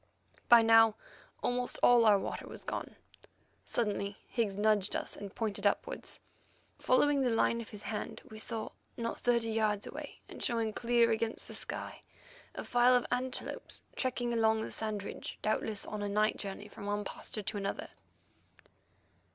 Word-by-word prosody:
By 235 Hz, -2 st, +9 dB
now 225 Hz, -1 st, +7 dB, 0.5 s
almost 245 Hz, 0 st, 0 dB
all 240 Hz, -1 st, +7 dB
our 210 Hz, -2 st, +7 dB
water -, -, -4 dB
was -, -, -7 dB
gone. -, -, -5 dB, 0.7 s
Suddenly 200 Hz, -3 st, -1 dB
Higgs 215 Hz, -5 st, -1 dB
nudged 210 Hz, -1 st, +2 dB
us -, -, -2 dB
and 200 Hz, -1 st, -8 dB
pointed 210 Hz, -2 st, 0 dB
upwards. 200 Hz, -, -2 dB, 0.6 s
Following 280 Hz, +2 st, +3 dB
the 255 Hz, -, +2 dB
line 235 Hz, 0 st, +2 dB
of 225 Hz, -, -9 dB
his 210 Hz, -1 st, -9 dB
hand, 210 Hz, -2 st, -4 dB
we 215 Hz, -, -10 dB
saw, 220 Hz, 0 st, -2 dB, 0.3 s
not 230 Hz, -1 st, -3 dB
thirty 235 Hz, -2 st, +2 dB
yards 215 Hz, -2 st, +1 dB
away -, -, -8 dB
and -, -, -8 dB
showing 225 Hz, -2 st, 0 dB
clear 235 Hz, 0 st, +3 dB
against 225 Hz, 0 st, -1 dB
the -, -, -9 dB
sky, -, -, -5 dB, 0.5 s
a -, -, -4 dB
file 245 Hz, +1 st, +5 dB
of 245 Hz, -, +2 dB
antelopes 250 Hz, +1 st, -3 dB
trekking 245 Hz, -2 st, -1 dB
along 220 Hz, -1 st, +3 dB
the -, -, -5 dB
sand 215 Hz, -2 st, -2 dB
ridge, -, -, -6 dB
doubtless 215 Hz, -1 st, 0 dB
on 210 Hz, -1 st, -5 dB
a 205 Hz, -, -2 dB
night 210 Hz, +1 st, +2 dB
journey 200 Hz, +1 st, -6 dB
from 200 Hz, 0 st, -9 dB
one 205 Hz, 0 st, -1 dB
pasturage 210 Hz, +1 st, -5 dB
to 210 Hz, -, -1 dB
another. 200 Hz, 0 st, -3 dB
220 Hz, 160 wpm, -32 LUFS, 210-235 Hz, 0.7 s, By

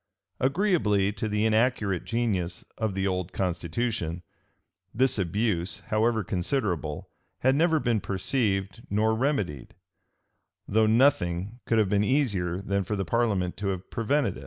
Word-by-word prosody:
Agreeably 130 Hz, -, +2 dB
to 110 Hz, +1 st, -4 dB
the 105 Hz, +1 st, +1 dB
inaccurate 110 Hz, -4 st, +1 dB
genius 100 Hz, -7 st, -1 dB
of 110 Hz, -4 st, -2 dB
the 95 Hz, 0 st, 0 dB
old 90 Hz, -2 st, -1 dB
constitution, 90 Hz, 0 st, -2 dB, 0.7 s
this 130 Hz, -1 st, +2 dB
abuse, 95 Hz, -1 st, -1 dB
however 110 Hz, +1 st, +2 dB
considerable, 90 Hz, -, -2 dB, 0.3 s
had 130 Hz, +1 st, +4 dB
never 160 Hz, +2 st, +3 dB
been 115 Hz, -6 st, 0 dB
perceived 95 Hz, 0 st, -1 dB
nor 110 Hz, +2 st, +2 dB
remedied; 110 Hz, -, -1 dB, 0.9 s
though 110 Hz, +1 st, +3 dB
nothing 110 Hz, -4 st, +2 dB
could 115 Hz, -, +2 dB
have 110 Hz, -2 st, +3 dB
been 100 Hz, 0 st, +2 dB
easier 100 Hz, -9 st, 0 dB
than 100 Hz, 0 st, 0 dB
for 105 Hz, +3 st, -3 dB
the 95 Hz, -1 st, -2 dB
parliament 100 Hz, -4 st, 0 dB
to 105 Hz, -, -3 dB
have 95 Hz, -1 st, -4 dB
prevented 120 Hz, -1 st, 0 dB
it. -, -, -9 dB
105 Hz, 135 wpm, -27 LUFS, 95-120 Hz, 0.9 s, had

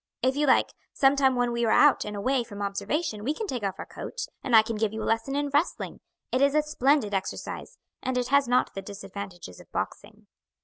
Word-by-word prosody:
If 260 Hz, +1 st, +2 dB
you 295 Hz, 0 st, +1 dB
like; 260 Hz, -, +4 dB, 0.2 s
sometime 270 Hz, -1 st, +4 dB
when 245 Hz, -1 st, +1 dB
we 235 Hz, 0 st, -1 dB
are 225 Hz, -, +2 dB
out 290 Hz, +5 st, +5 dB
and 210 Hz, 0 st, -5 dB
away 255 Hz, +5 st, +1 dB
from 205 Hz, -3 st, -10 dB
observation 210 Hz, +4 st, -2 dB
we 290 Hz, +6 st, 0 dB
can 440 Hz, -, -3 dB
take 255 Hz, -, -3 dB
off 195 Hz, -2 st, -2 dB
our -, -, -6 dB
coats, 485 Hz, -, -6 dB, 0.2 s
and 250 Hz, -, +2 dB
I 220 Hz, -, +9 dB
can 225 Hz, +1 st, -4 dB
give 215 Hz, -1 st, 0 dB
you 220 Hz, 0 st, -4 dB
a -, -, -3 dB
lesson 225 Hz, +5 st, 0 dB
in 290 Hz, 0 st, 0 dB
wrestling; 290 Hz, +5 st, -1 dB, 0.3 s
it 255 Hz, -, +1 dB
is 280 Hz, +1 st, +4 dB
a 305 Hz, -, +4 dB
splendid 275 Hz, -6 st, +2 dB
exercise, 195 Hz, -1 st, -4 dB, 0.2 s
and 260 Hz, -1 st, -1 dB
it 245 Hz, 0 st, -1 dB
has 280 Hz, -1 st, +4 dB
not 250 Hz, +1 st, +2 dB
the 195 Hz, -, -5 dB
disadvantages 195 Hz, -, -8 dB
of -, -, -16 dB
boxing." -, -, -5 dB
245 Hz, 225 wpm, -27 LUFS, 210-280 Hz, 0.3 s, I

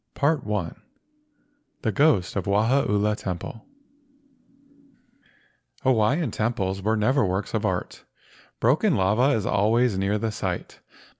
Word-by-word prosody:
PART 145 Hz, 0 st, +1 dB
I -, -, -6 dB
LEGENDS 100 Hz, -6 st, -3 dB
I -, -, -31 dB, 1.0 s
THE 110 Hz, -, +1 dB
GHOST 140 Hz, -, +2 dB
OF 100 Hz, -2 st, -2 dB
WAHAULA 105 Hz, 0 st, +2 dB
TEMPLE 90 Hz, +5 st, -6 dB, 2.2 s
AWAIIAN 130 Hz, +4 st, +2 dB
temples 100 Hz, -4 st, -2 dB
were 110 Hz, +3 st, +1 dB
never 130 Hz, +6 st, +2 dB
works 95 Hz, 0 st, -2 dB
of -, -, 0 dB
art. -, -, -4 dB, 0.6 s
Broken 150 Hz, -, +2 dB
lava 110 Hz, +9 st, +2 dB
was 110 Hz, -, -2 dB
always 110 Hz, 0 st, +2 dB
near 100 Hz, +2 st, 0 dB
the 110 Hz, +1 st, -2 dB
site. -, -, -5 dB
110 Hz, 125 wpm, -24 LUFS, 100-130 Hz, 2.2 s, GHOST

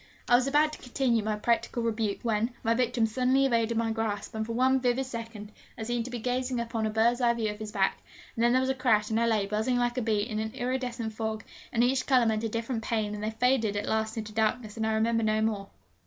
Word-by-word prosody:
I -, -, +2 dB
was 255 Hz, +2 st, +3 dB
about 300 Hz, +2 st, +3 dB
to -, -, -8 dB
continue 245 Hz, -2 st, +1 dB
my 215 Hz, 0 st, -1 dB
practical 235 Hz, +2 st, 0 dB
rebuke, 220 Hz, -3 st, -1 dB
when 230 Hz, +1 st, 0 dB
my 230 Hz, -, +3 dB
victim 240 Hz, -1 st, +1 dB
suddenly 255 Hz, +4 st, +2 dB
evaded 230 Hz, -3 st, +1 dB
my 230 Hz, 0 st, +1 dB
grasp; 220 Hz, -2 st, -3 dB
and 220 Hz, 0 st, -2 dB
for 230 Hz, +1 st, -4 dB
one 260 Hz, +2 st, +3 dB
vivid 255 Hz, +1 st, +1 dB
second 230 Hz, -4 st, -7 dB, 0.3 s
I 225 Hz, -, -4 dB
seemed 240 Hz, 0 st, -2 dB
to -, -, -6 dB
be 245 Hz, -, -4 dB
gazing 250 Hz, +1 st, -1 dB
upon 230 Hz, -1 st, -2 dB
a -, -, -1 dB
birdseye 235 Hz, +2 st, +3 dB
view 220 Hz, -2 st, -1 dB
of 210 Hz, -, -14 dB
his 215 Hz, -1 st, -6 dB
back; 195 Hz, -2 st, +1 dB, 0.4 s
and 230 Hz, -, 0 dB
then 240 Hz, -, +4 dB
there 255 Hz, +1 st, +3 dB
was 260 Hz, 0 st, +1 dB
a -, -, +1 dB
crash, 225 Hz, -5 st, +2 dB
and 220 Hz, -, +2 dB
I 235 Hz, -, +2 dB
lay, 215 Hz, -3 st, +2 dB
buzzing 215 Hz, +5 st, 0 dB
like 245 Hz, +1 st, 0 dB
a -, -, -1 dB
bee, 220 Hz, -2 st, +1 dB
in 215 Hz, -3 st, -3 dB
an 220 Hz, +2 st, -4 dB
iridescent 245 Hz, -3 st, -3 dB
fog, 220 Hz, 0 st, -3 dB, 0.3 s
and 235 Hz, -, +2 dB
each 260 Hz, +1 st, +1 dB
colour 255 Hz, -3 st, +4 dB
meant 220 Hz, 0 st, 0 dB
a 225 Hz, -, -1 dB
different 230 Hz, +1 st, -3 dB
pain, 215 Hz, -2 st, -1 dB
and 210 Hz, 0 st, -5 dB
they 215 Hz, -, 0 dB
faded 225 Hz, -2 st, +1 dB
at 205 Hz, -, -2 dB
last 220 Hz, 0 st, -1 dB
into 215 Hz, -1 st, -5 dB
darkness, 220 Hz, 0 st, 0 dB
and 220 Hz, -1 st, -1 dB
I 220 Hz, -, +1 dB
remember 230 Hz, +1 st, +2 dB
no 215 Hz, 0 st, +1 dB
more. 215 Hz, -3 st, -1 dB
230 Hz, 255 wpm, -28 LUFS, 220-245 Hz, 0.4 s, then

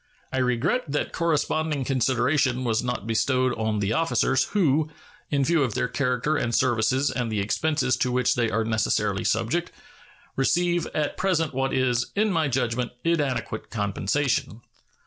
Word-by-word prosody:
I 130 Hz, -, 0 dB
regret 130 Hz, -, +1 dB
that 145 Hz, +1 st, -2 dB
corresponding 155 Hz, -3 st, 0 dB
consideration 130 Hz, 0 st, +1 dB
was 115 Hz, -2 st, +1 dB
not 125 Hz, -4 st, -3 dB
bestowed 125 Hz, +3 st, +1 dB
on 110 Hz, -1 st, -1 dB
the 100 Hz, +1 st, 0 dB
officers, 135 Hz, -3 st, +2 dB
who, 155 Hz, -6 st, +1 dB, 0.4 s
in 140 Hz, -2 st, +1 dB
view 165 Hz, 0 st, +2 dB
of 125 Hz, -6 st, 0 dB
their -, -, 0 dB
character 140 Hz, +3 st, 0 dB
and 120 Hz, -3 st, -1 dB
services 130 Hz, +2 st, +2 dB
and 120 Hz, -2 st, -2 dB
the 105 Hz, -, -1 dB
expenses 145 Hz, +7 st, 0 dB
to 125 Hz, -, 0 dB
which 125 Hz, -1 st, +2 dB
they 120 Hz, -2 st, 0 dB
are 110 Hz, 0 st, 0 dB
necessarily 105 Hz, -3 st, 0 dB
subject, 120 Hz, +11 st, 0 dB, 0.6 s
receive 175 Hz, +5 st, +1 dB
at 150 Hz, -1 st, -1 dB
present 165 Hz, -6 st, 0 dB
what 135 Hz, +1 st, -1 dB
is, 125 Hz, -2 st, +1 dB
in 215 Hz, +1 st, +2 dB
my 165 Hz, -4 st, +1 dB
judgment, 125 Hz, -2 st, -1 dB
inadequate 145 Hz, -8 st, -1 dB
compensation. 110 Hz, +3 st, -1 dB
130 Hz, 150 wpm, -25 LUFS, 115-150 Hz, 0.6 s, officers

